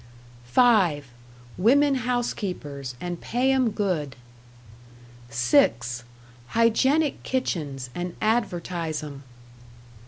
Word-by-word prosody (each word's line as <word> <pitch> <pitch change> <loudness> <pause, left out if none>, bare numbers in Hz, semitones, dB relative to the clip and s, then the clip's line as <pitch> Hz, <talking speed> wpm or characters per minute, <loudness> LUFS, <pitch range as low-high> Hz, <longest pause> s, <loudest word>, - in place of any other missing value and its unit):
"(5) 175 - +3 0.5
Women 280 +8 +4
housekeepers 195 - -3
and 175 -1 -5
pay 255 +3 +1
'em 260 -3 +3
good. 180 -10 -2 1.1
"(6) 120 0 +2 0.4
Hygienic 265 - +2
kitchens 145 - -3
and 175 0 -4
advertise 175 -8 -1
'em. 140 -2 -8
180 Hz, 75 wpm, -25 LUFS, -, 1.1 s, Women